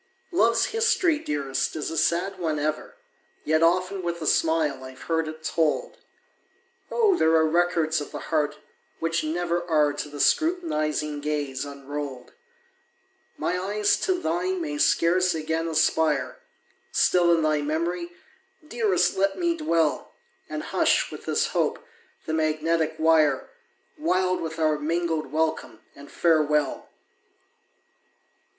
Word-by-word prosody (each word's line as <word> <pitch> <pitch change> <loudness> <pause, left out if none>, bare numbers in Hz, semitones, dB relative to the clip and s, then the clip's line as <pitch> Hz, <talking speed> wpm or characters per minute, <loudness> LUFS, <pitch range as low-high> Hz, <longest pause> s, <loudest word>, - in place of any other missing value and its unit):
Love's 235 -10 +3
history, 385 -8 +2
dearest, 140 - -2
is 155 0 -3
a - - -4
sad 185 +4 0
one 160 -3 -1
ever, 155 +1 -3 0.5
Yet 155 +1 +2
often 185 +3 +2
with 170 -1 -3
a 160 - -5
smile 155 -4 +1
I've 130 0 -11
heard 160 -1 -1
it 155 0 -8
told! 160 -1 -1 0.9
Oh, 435 -5 +3
there 160 - +3
are 160 0 +4
records 165 -1 +1
of 145 - -7
the - - -5 0.2
heart 150 -2 +1 0.4
which 165 0 -1
never 170 +2 -1
Are 150 -2 +3
to 145 +1 -5
the 145 0 -9
scrutinizing 155 - 0
gaze 145 -3 -2
unrolled! 140 -2 -7 1.0
My 180 - -1
eyes 205 +2 +1
to 375 - 0
thine 360 +2 -1
may 300 -3 -4
scarce 180 - +3
again 160 +1 -2
aspire 160 - +1 0.5
Still 175 -1 +3
in 165 - 0
thy 155 -1 +1
memory, 170 +4 -2 0.6
dearest 220 - +1
let 195 0 +1
me 345 -1 +1
dwell, 170 - 0 0.3
And - - -4
hush, - - +1
with - - -9
this - - 0
hope, - - 0 0.5
the 160 - -3
magnetic 160 0 0
wire, 155 -4 +3 0.5
Wild 185 - +1
with 160 0 -5
our 155 -2 +1
mingled 160 -2 -1
welcome 155 -7 -2
and 140 0 -13
farewell! 150 -4 +1
160 Hz, 130 wpm, -25 LUFS, 150-180 Hz, 1.0 s, are